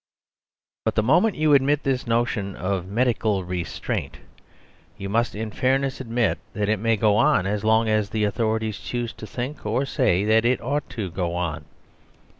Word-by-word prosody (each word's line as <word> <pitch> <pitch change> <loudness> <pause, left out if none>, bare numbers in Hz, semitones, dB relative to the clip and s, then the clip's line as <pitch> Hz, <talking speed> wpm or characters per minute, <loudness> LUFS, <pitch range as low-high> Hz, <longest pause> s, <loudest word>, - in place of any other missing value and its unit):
But 110 - 0
the 110 - +2
moment 175 - +3
you 155 -1 +3
admit 140 +2 +3
this 130 -3 -1
notion 115 -4 0
of 95 -1 -2
medical 110 -2 +1
restraint, 90 -1 -4 0.8
you 100 -1 -5
must 115 +2 0
in 110 0 -4
fairness 135 +3 0
admit 115 -3 0
that 105 0 -1
it 110 -2 +1
may 115 +1 +2
go 105 0 +3
on 140 -6 +3
as 105 +1 -1
long 110 +1 +3
as 110 -2 +1
the 110 -1 -1
authorities 110 -1 -1
choose 120 +2 -4
to 110 - -10
think 125 +7 -5
(or 110 +6 0
say) 95 -7 +1
that 110 +1 +4
it 125 +1 +2
ought 145 +4 -2
to 100 -5 -3
go 85 -1 -2
on. 85 -4 -3
110 Hz, 175 wpm, -24 LUFS, 100-125 Hz, 0.8 s, that